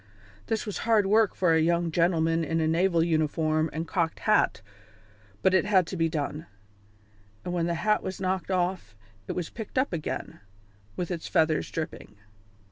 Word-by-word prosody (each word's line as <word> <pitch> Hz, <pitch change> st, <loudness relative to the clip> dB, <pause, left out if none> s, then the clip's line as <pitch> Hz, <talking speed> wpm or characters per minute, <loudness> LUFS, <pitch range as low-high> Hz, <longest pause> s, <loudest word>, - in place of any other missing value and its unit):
This 220 Hz, -1 st, -1 dB
was 210 Hz, -, -4 dB
hard 220 Hz, -3 st, +3 dB
work 215 Hz, +1 st, +3 dB
for 180 Hz, -3 st, +3 dB
a 160 Hz, -, +4 dB
young 170 Hz, +1 st, +1 dB
gentleman 165 Hz, -1 st, +2 dB
in 165 Hz, +1 st, -1 dB
a 160 Hz, -, +1 dB
naval 170 Hz, +1 st, +2 dB
uniform 155 Hz, -1 st, +1 dB
and 160 Hz, +2 st, -4 dB
cocked 170 Hz, -4 st, -1 dB
hat, -, -, +2 dB, 0.8 s
but 190 Hz, -, +4 dB
it 185 Hz, -4 st, +3 dB
had 190 Hz, -4 st, +3 dB
to 185 Hz, -, -6 dB
be 165 Hz, -2 st, +1 dB
done; 155 Hz, +1 st, -4 dB, 1.0 s
and 175 Hz, -, -3 dB
when 170 Hz, -1 st, 0 dB
the 170 Hz, -, 0 dB
hat 210 Hz, +5 st, +1 dB
was 190 Hz, -1 st, -5 dB
knocked 185 Hz, -1 st, -2 dB
off 180 Hz, -, -1 dB, 0.3 s
it -, -, -2 dB
was 175 Hz, -2 st, -4 dB
picked 220 Hz, +2 st, -8 dB
up 260 Hz, -5 st, +1 dB
again, 155 Hz, -3 st, -4 dB, 0.6 s
with 180 Hz, 0 st, -3 dB
its 170 Hz, -2 st, -4 dB
feathers 155 Hz, -1 st, +1 dB
dripping. 155 Hz, -9 st, -6 dB
170 Hz, 175 wpm, -27 LUFS, 160-190 Hz, 1.0 s, a